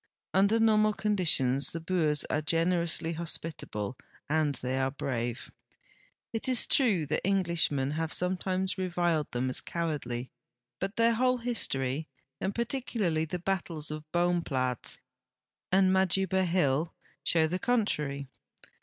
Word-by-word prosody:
Under 200 +4 +4
normal 215 -1 +4
conditions 155 -11 +2
the 165 - -3
Boers 160 -4 +1
are 155 - 0
gener 165 +3 +1
ousl}" 165 0 -1
hospitable 155 -9 -2 0.3
and 150 -1 +1
they 130 +1 -2
are 135 0 +1
brave. 120 -3 -4 0.8
It 225 +3 0
is 255 -2 +6
true 210 - +3
that 150 - -1
Englishmen 170 -8 +1
have 160 +1 -2
sometimes 185 +1 0
reviled 175 -4 0
them 125 +1 -1
as 130 - +1
cowardl}\ 140 -7 -3 0.5
but 195 +2 -3
their 230 0 +4
whole 255 +2 +2
his 240 -1 0
torv, 135 +4 -2 0.3
and 195 - -2
particularly 230 - -1
the 170 +3 -4
battles 170 -4 -2
of 155 0 -7
Boomi>laats 165 -8 0 0.7
and 190 0 +4
Majuba 190 0 +2
Hill, 160 -2 +1 0.3
shows 160 -1 +2
the 180 - -1
contrary. 150 - 0
170 Hz, 130 wpm, -29 LUFS, 150-190 Hz, 0.8 s, is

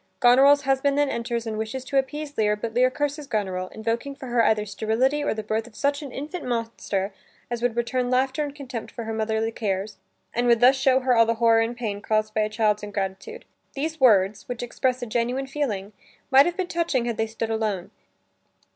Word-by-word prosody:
Goneril's 275 +4 +6
husband 275 +1 +1
then 290 -1 +3
enters 235 -1 -2
and 215 -1 -3
wishes 235 +4 -4
to 275 - -1
appease 290 +2 -4
Lear, 210 -1 +2
but 220 +2 -5
Lear 250 +2 +4
curses 290 +2 -3
Goneril, 190 -6 -2
invoking 230 +7 -3
for 270 -3 -9
her 240 -1 +3
either 215 -1 +2
sterility 225 +8 0
or 290 - 0
the 215 - -4
birth 220 +2 -2
of 230 - -17
such 285 +3 0
an 280 -3 -7
infant 305 +7 -6
monster 225 -5 -2 0.4
as 240 -1 -2
would 245 -1 0
return 245 +1 -1
laughter 260 +3 +1
and 285 -1 -6
contempt 260 -5 -6
for 235 - -6
her 225 0 -4
motherly 220 0 -1
cares, 205 -2 -3 0.4
and 240 +1 0
would 235 -1 +5
thus 250 +3 +6
show 265 0 +3
her 255 -1 +2
all 230 -1 +5
the 230 - +1
horror 230 0 +4
and 235 +1 -2
pain 210 -4 -3
caused 215 0 0
by 215 - +1
a 215 - 0
child's 215 -1 +1
ingratitude. 205 - -5 0.3
These 315 +3 -3
words 205 -3 +4
which 245 -1 -4
express 250 +1 -1
a - - -2
genuine 245 +4 -1
feeling, 225 -8 -3 0.4
might 270 +3 +7
have 350 - -2
been 375 - 0
touching 335 -8 0
had 235 -2 -2
they 225 - 0
stood 225 0 -4
alone. 215 -5 -2
235 Hz, 210 wpm, -24 LUFS, 220-270 Hz, 0.4 s, might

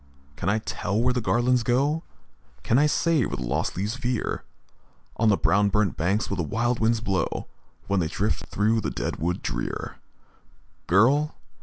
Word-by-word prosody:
can 85 +6 -2
I 105 - +2
tell 105 -1 -2
where 125 +2 +2
the 125 - -1
garlands 120 +2 +2
go? 140 +7 +1 0.6
Can 120 - +3
I 150 - +5
say 160 -1 +2
where - - -3
the 65 - -4
lost 75 +9 -2
leaves 105 +6 -2
veer 125 -2 -2 0.7
On 115 -1 +3
the 100 - +4
brown 100 +5 +3
burnt 105 -2 +1
banks, 95 +7 0
when 100 - -3
the 90 - 0
wild 120 +9 0
winds 115 0 +2
blow, 95 -6 -1 0.4
When 100 -1 +1
they 85 - +1
drift 105 +6 -2
through 110 +2 +1
the - - -2
dead - - -3
wood 90 +3 -2
drear? - - -4 0.9
Girl! 135 - +3
110 Hz, 175 wpm, -25 LUFS, 95-125 Hz, 0.9 s, I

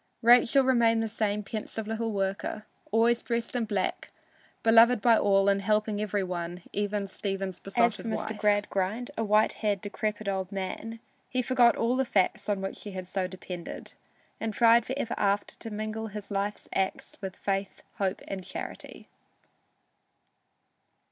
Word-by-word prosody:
Rachel 245 +3 +6
remained 230 -3 +3
the - - -1
same 210 -1 -1
pensive 215 +1 -5
little 225 0 -2
worker, 200 +2 -2 0.3
always 230 +2 +3
dressed 235 0 -2
in 240 -2 +1
black, 205 -4 -2 0.5
beloved 230 +1 +6
by 230 +2 +5
all 195 -2 +3
and 200 0 +3
helping 210 +1 +1
every 205 -1 0
one, 175 -1 -4
even 205 0 -1
Stephen's 195 -1 -4
besotted 230 +2 +1
wife. - - -1
As - - -5
for 220 - -3
Mr. - - -10
Gradgrind, 205 +2 0
a 225 - -1
white 215 0 +3
haired, 205 -2 -1
decrepit 210 +1 -3
old 190 -1 -2
man, 205 +4 -5 0.3
he 255 0 0
forgot 245 -1 +4
all 235 +2 +1
the 265 - +2
facts 205 -3 +1
on 200 -2 0
which 195 - -5
he 205 - -8
had 185 -1 -5
so 185 0 -2
depended, 180 -1 -8 0.5
and 220 -2 -3
tried 230 0 +5
for 260 - -2
ever 240 -4 -2
after 200 0 0
to 225 - -7
mingle 215 +1 -4
his 210 0 -7
life's 200 +1 -2
acts 190 0 -2
with 190 -2 -5
Faith, 195 0 -3 0.2
Hope 195 -1 -1
and 190 -1 -5
Charity. 180 - -7
210 Hz, 165 wpm, -28 LUFS, 195-225 Hz, 0.5 s, Rachel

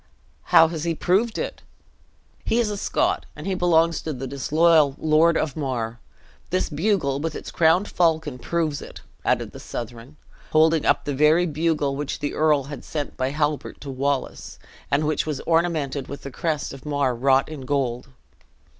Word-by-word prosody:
"How 165 - +6
has 160 -2 -4
he 170 -1 -1
proved 205 +8 +1
it?" - - -4 0.8
"He 230 - 0
is 230 -3 +1
a - - -2
Scot, 200 - 0
and 150 - -9
he 195 - -1
belongs 170 -3 +2
to 155 - -4
the 135 0 -5
disloyal 150 +2 +3
Lord 160 +2 +3
of 150 -4 -1
Mar. 120 -6 -3 0.5
This 185 -1 -1
bugle, 150 -4 0
with 160 +1 -3
its - - -7
crowned 170 +5 +3
falcon, 160 -6 0
proves 160 -2 -1
it," - - -10 0.2
added - - 0
the - - -10
Southron, 120 +5 -8 0.4
holding 160 0 +4
up - - +2
the 145 - -2
very 150 +5 +4
bugle 155 -3 0
which 145 0 -3
the 145 - -3
earl 150 -2 +3
had 140 +1 -8
sent 150 -2 -4
by 130 0 -1
Halbert 150 +1 -2
to 140 - -6
Wallace, 135 0 -3 0.3
and 145 +2 +1
which 155 +1 0
was 150 -3 -2
ornamented 165 -5 0
with 140 - -8
the 140 - -7
crest 150 0 -2
of 135 - -11
Mar 145 -3 0
wrought 135 +2 +3
in 155 -3 -8
gold. 130 -3 -2
150 Hz, 175 wpm, -23 LUFS, 140-165 Hz, 0.8 s, How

